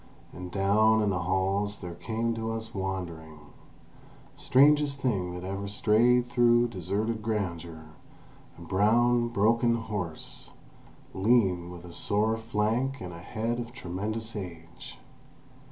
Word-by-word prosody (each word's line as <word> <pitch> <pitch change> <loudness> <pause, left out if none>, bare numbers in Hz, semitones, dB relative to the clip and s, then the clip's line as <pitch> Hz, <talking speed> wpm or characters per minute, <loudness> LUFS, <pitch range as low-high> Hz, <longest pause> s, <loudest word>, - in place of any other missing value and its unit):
And 90 0 -7
down 105 +3 +3
in 105 - +1
the 90 - -1
halls 95 +3 0
there 90 -2 -7
came 115 +6 -2
to 115 0 -3
us 110 0 -6
wandering—strangest 95 - -1
thing 95 -9 -1
that 90 - -7
ever 100 +1 -4
strayed 115 +4 +3
through 120 0 +4
deserted 105 +3 -2
grandeur—a 85 - -7
brown, 120 +6 +3
broken 115 +2 +2
horse, 105 -8 -5 0.6
lean, 95 -4 +2
with 90 0 -10
a 85 - -10
sore 105 +5 +1
flank 115 +4 -1
and 90 -1 -7
a 85 - -9
head 115 +6 -3
of 120 0 -6
tremendous 110 +5 -4
age. 85 -4 -8
105 Hz, 120 wpm, -28 LUFS, 90-115 Hz, 0.6 s, through